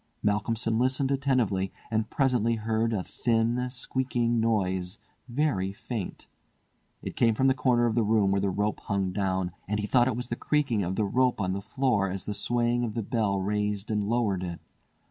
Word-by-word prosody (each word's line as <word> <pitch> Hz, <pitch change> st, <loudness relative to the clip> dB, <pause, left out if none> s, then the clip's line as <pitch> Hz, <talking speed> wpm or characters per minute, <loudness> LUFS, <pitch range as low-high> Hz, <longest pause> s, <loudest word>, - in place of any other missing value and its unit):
Malcolmson 110 Hz, +2 st, +1 dB
listened 130 Hz, +2 st, +1 dB
attentively, 125 Hz, -9 st, +1 dB, 0.2 s
and 110 Hz, 0 st, 0 dB
presently 125 Hz, -4 st, +2 dB
heard 110 Hz, +1 st, 0 dB
a 105 Hz, -5 st, -1 dB
thin, 120 Hz, +3 st, 0 dB
squeaking 120 Hz, -1 st, 0 dB
noise, 95 Hz, -4 st, 0 dB, 0.3 s
very 120 Hz, -8 st, 0 dB
faint. 105 Hz, 0 st, -6 dB, 0.8 s
It -, -, -5 dB
came 115 Hz, -2 st, +3 dB
from 130 Hz, -, +1 dB
the 135 Hz, -, +5 dB
corner 125 Hz, -2 st, +2 dB
of 115 Hz, -, +1 dB
the 115 Hz, -, +2 dB
room 105 Hz, -2 st, +3 dB
where 100 Hz, 0 st, +2 dB
the 100 Hz, -, +1 dB
rope 105 Hz, +3 st, -1 dB
hung 100 Hz, -2 st, 0 dB
down, 95 Hz, -2 st, -1 dB, 0.2 s
and 105 Hz, +2 st, -1 dB
he 105 Hz, -, -1 dB
thought 120 Hz, +3 st, +4 dB
it 130 Hz, -, 0 dB
was 125 Hz, 0 st, -4 dB
the 120 Hz, -, -1 dB
creaking 135 Hz, -6 st, +1 dB
of 95 Hz, 0 st, -2 dB
the 105 Hz, -, +1 dB
rope 125 Hz, +4 st, +2 dB
on 95 Hz, -2 st, 0 dB
the 100 Hz, -, -3 dB
floor 120 Hz, -5 st, 0 dB
as 95 Hz, +1 st, -4 dB
the 105 Hz, -, -3 dB
swaying 120 Hz, +2 st, +1 dB
of 110 Hz, -3 st, -3 dB
the 115 Hz, -, -1 dB
bell 100 Hz, -3 st, 0 dB
raised 105 Hz, +1 st, -1 dB
and 105 Hz, -1 st, +1 dB
lowered 105 Hz, -3 st, 0 dB
it. 85 Hz, -2 st, -5 dB
110 Hz, 190 wpm, -28 LUFS, 100-120 Hz, 0.8 s, the